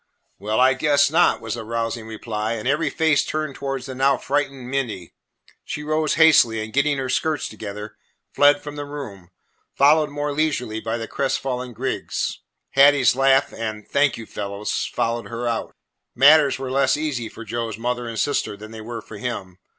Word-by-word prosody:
"Well, 110 Hz, +2 st, -1 dB
I 130 Hz, +1 st, +5 dB
guess 145 Hz, +1 st, +3 dB
not!" 175 Hz, +2 st, +3 dB
was 110 Hz, -1 st, -4 dB
the 115 Hz, -1 st, -5 dB
rousing 115 Hz, 0 st, -3 dB
reply, 110 Hz, 0 st, -3 dB
and 115 Hz, +1 st, -4 dB
every 150 Hz, +4 st, +1 dB
face 160 Hz, -3 st, +2 dB
turned 155 Hz, -2 st, -3 dB
towards 135 Hz, 0 st, -4 dB
the 130 Hz, -, -6 dB
now 135 Hz, +2 st, +2 dB
frightened 135 Hz, -3 st, -2 dB
Minty. 120 Hz, -10 st, -3 dB, 0.5 s
She 150 Hz, -, -5 dB
rose 155 Hz, 0 st, 0 dB
hastily 150 Hz, -8 st, +5 dB
and, 110 Hz, 0 st, -9 dB
getting 140 Hz, +1 st, +2 dB
her 135 Hz, -1 st, -2 dB
skirts 150 Hz, +3 st, 0 dB
together, 105 Hz, 0 st, -8 dB, 0.4 s
fled 145 Hz, 0 st, +4 dB
from 145 Hz, 0 st, -7 dB
the 145 Hz, -, -4 dB
room, 110 Hz, -12 st, -8 dB, 0.5 s
followed 150 Hz, +2 st, +4 dB
more 145 Hz, 0 st, -3 dB
leisurely 140 Hz, -8 st, -1 dB
by 115 Hz, +1 st, -2 dB
the 115 Hz, -1 st, -5 dB
crestfallen 130 Hz, -2 st, -2 dB
Griggs. 130 Hz, +4 st, -3 dB, 0.3 s
Hattie's 140 Hz, -2 st, +5 dB
laugh 135 Hz, 0 st, +3 dB
and 110 Hz, -2 st, -5 dB
"Thank 140 Hz, -2 st, +2 dB
you, 115 Hz, -, -8 dB
fellows," 100 Hz, 0 st, -3 dB
followed 115 Hz, -2 st, -1 dB
her 115 Hz, +2 st, -4 dB
out. 115 Hz, -1 st, -3 dB, 0.4 s
Matters 145 Hz, +2 st, +6 dB
were 130 Hz, -1 st, -5 dB
less 135 Hz, +1 st, +2 dB
easy 140 Hz, -7 st, -3 dB
for 115 Hz, -, -10 dB
Joe's 115 Hz, 0 st, -4 dB
mother 120 Hz, +1 st, -2 dB
and 115 Hz, -1 st, -6 dB
sister 125 Hz, -5 st, -1 dB
than 110 Hz, +1 st, -11 dB
they 110 Hz, -1 st, -8 dB
were 115 Hz, 0 st, -7 dB
for 110 Hz, -, -10 dB
him. 95 Hz, -6 st, -5 dB
130 Hz, 180 wpm, -22 LUFS, 115-145 Hz, 0.5 s, Matters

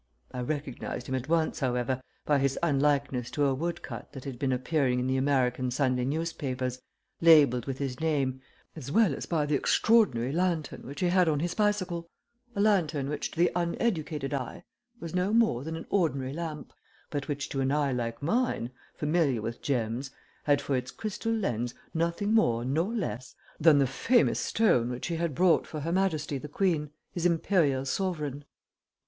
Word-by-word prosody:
I 125 Hz, -, -5 dB
recognized 135 Hz, -2 st, -4 dB
him 130 Hz, -, -4 dB
at 130 Hz, +2 st, -3 dB
once, 165 Hz, -1 st, +1 dB
however, 125 Hz, 0 st, 0 dB, 0.2 s
by 145 Hz, -1 st, +3 dB
his 135 Hz, 0 st, +1 dB
unlikeness 140 Hz, -4 st, +1 dB
to 145 Hz, -, +1 dB
a 135 Hz, -, +2 dB
wood 170 Hz, +6 st, -3 dB
cut -, -, -8 dB
that 135 Hz, -, -8 dB
had 130 Hz, -4 st, -6 dB
been 135 Hz, -2 st, 0 dB
appearing 130 Hz, 0 st, +1 dB
in 125 Hz, -, -1 dB
the 130 Hz, 0 st, +1 dB
American 130 Hz, -2 st, +1 dB
Sunday 125 Hz, -1 st, +1 dB
newspapers, 135 Hz, -4 st, -2 dB, 0.4 s
labelled 145 Hz, -7 st, +6 dB
with 135 Hz, -1 st, -3 dB
his 135 Hz, -3 st, -3 dB
name, 140 Hz, -5 st, 0 dB, 0.3 s
as 140 Hz, -4 st, -7 dB
well 215 Hz, -5 st, +4 dB
as -, -, -6 dB
by 160 Hz, -4 st, +1 dB
the 150 Hz, -, -1 dB
extraordinary 140 Hz, -, +3 dB
lantern 170 Hz, -5 st, -1 dB
which 140 Hz, +6 st, -7 dB
he 180 Hz, -, +3 dB
had 180 Hz, -2 st, +4 dB
on 150 Hz, -2 st, +1 dB
his 175 Hz, +3 st, -1 dB
bicycle, 185 Hz, -5 st, 0 dB, 0.5 s
a -, -, -3 dB
lantern 160 Hz, -10 st, +2 dB
which 150 Hz, -, -2 dB
to -, -, -14 dB
the 175 Hz, +1 st, +4 dB
uneducated 170 Hz, -, -1 dB
eye 130 Hz, -3 st, -4 dB, 0.4 s
was 165 Hz, 0 st, -7 dB
no 180 Hz, +2 st, +1 dB
more 225 Hz, -, +3 dB
than 160 Hz, +2 st, -4 dB
an 165 Hz, -, -7 dB
ordinary 140 Hz, -8 st, +1 dB
lamp, 160 Hz, -2 st, -6 dB, 0.4 s
but 145 Hz, -2 st, -3 dB
which 145 Hz, -1 st, -3 dB
to 135 Hz, -, -2 dB
an 135 Hz, 0 st, +1 dB
eye 145 Hz, -2 st, +1 dB
like 115 Hz, 0 st, -3 dB
mine, 170 Hz, -, 0 dB, 0.2 s
familiar 150 Hz, -5 st, +1 dB
with 115 Hz, +1 st, -5 dB
gems, 125 Hz, -1 st, -1 dB, 0.4 s
had 145 Hz, -1 st, +4 dB
for 140 Hz, -1 st, -1 dB
its 125 Hz, 0 st, -2 dB
crystal 220 Hz, -, -4 dB
lens 120 Hz, -, -1 dB, 0.2 s
nothing 170 Hz, +6 st, 0 dB
more 120 Hz, -, +3 dB
nor 160 Hz, -, 0 dB
less 150 Hz, -, -4 dB, 0.2 s
than 155 Hz, -1 st, +6 dB
the 140 Hz, -, +4 dB
famous 230 Hz, -, +2 dB
stone 125 Hz, -, +2 dB
which 125 Hz, 0 st, -4 dB
he 170 Hz, -, -1 dB
had 165 Hz, -4 st, -1 dB
brought 180 Hz, +2 st, +3 dB
for 155 Hz, -, -5 dB
her 165 Hz, +3 st, -2 dB
Majesty 155 Hz, -6 st, 0 dB
the 150 Hz, -, -7 dB
Queen, 155 Hz, -2 st, 0 dB, 0.2 s
his 175 Hz, -, -4 dB
imperial 165 Hz, -6 st, +2 dB
sovereign. 150 Hz, -4 st, -2 dB
145 Hz, 180 wpm, -29 LUFS, 130-170 Hz, 0.5 s, labelled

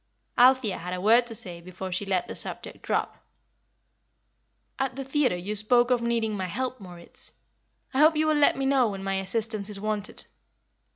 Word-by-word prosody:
Althea 250 Hz, -5 st, +4 dB
had 180 Hz, +2 st, -4 dB
a -, -, -5 dB
word 230 Hz, +5 st, +4 dB
to 225 Hz, -, -6 dB
say 175 Hz, -4 st, -5 dB
before 185 Hz, +2 st, -7 dB
she 190 Hz, +3 st, -2 dB
let 185 Hz, -2 st, 0 dB
the -, -, -6 dB
subject -, -, -5 dB
drop. -, -, -2 dB, 1.6 s
"At 265 Hz, -2 st, -1 dB
the 270 Hz, -, -4 dB
theatre 270 Hz, -7 st, +1 dB
you 200 Hz, +4 st, -4 dB
spoke 240 Hz, +4 st, +3 dB
of 245 Hz, -1 st, +3 dB
needing 230 Hz, -2 st, 0 dB
my 190 Hz, -2 st, -3 dB
help, 255 Hz, +7 st, -3 dB
Moritz. 175 Hz, -3 st, -9 dB, 0.6 s
I 260 Hz, -, +1 dB
hope 310 Hz, +2 st, +6 dB
you 310 Hz, +1 st, +2 dB
will 310 Hz, -, +3 dB
let 295 Hz, -1 st, +4 dB
me 270 Hz, -, -1 dB
know 270 Hz, -4 st, +3 dB
when 195 Hz, -1 st, -6 dB
my 195 Hz, 0 st, -1 dB
assistance 215 Hz, +1 st, -2 dB
is 205 Hz, -1 st, -3 dB
wanted." 210 Hz, 0 st, -1 dB
215 Hz, 185 wpm, -27 LUFS, 190-255 Hz, 1.6 s, hope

